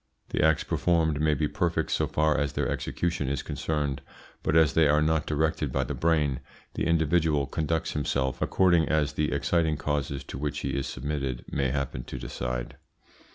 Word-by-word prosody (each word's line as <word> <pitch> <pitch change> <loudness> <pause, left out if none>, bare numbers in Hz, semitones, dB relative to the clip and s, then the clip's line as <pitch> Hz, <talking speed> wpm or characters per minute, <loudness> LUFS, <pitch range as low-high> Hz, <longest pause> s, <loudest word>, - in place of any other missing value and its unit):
The - - 0
acts 80 -1 +3
performed 80 -4 +1
may 75 -1 +3
be 75 +2 0
perfect - - -1
so - - +1
far 75 0 +2
as 75 -2 0
their - - 0
execution 85 -6 -2
is 70 -2 -2
concerned, 75 -3 -2 0.4
but 75 - 0
as 80 -3 +5
they 80 -2 +5
are 75 +1 +4
not 80 -1 +1
directed 75 -2 0
by 65 +1 +1
the - - -4
brain, 75 -5 +1 0.3
the - - -1
individual 80 -3 +2
conducts 80 +3 -1
himself 65 -2 -1
according 85 -4 +3
as 75 -2 +1
the 75 0 0
exciting 80 -3 +1
causes 70 -2 -2
to 65 - -7
which 75 0 -2
he 70 - -2
is 70 0 -2
submitted 70 -2 -3
may 70 -2 0
happen 70 -2 -3
to - - -6
decide. - - -4
75 Hz, 180 wpm, -27 LUFS, 70-80 Hz, 0.4 s, as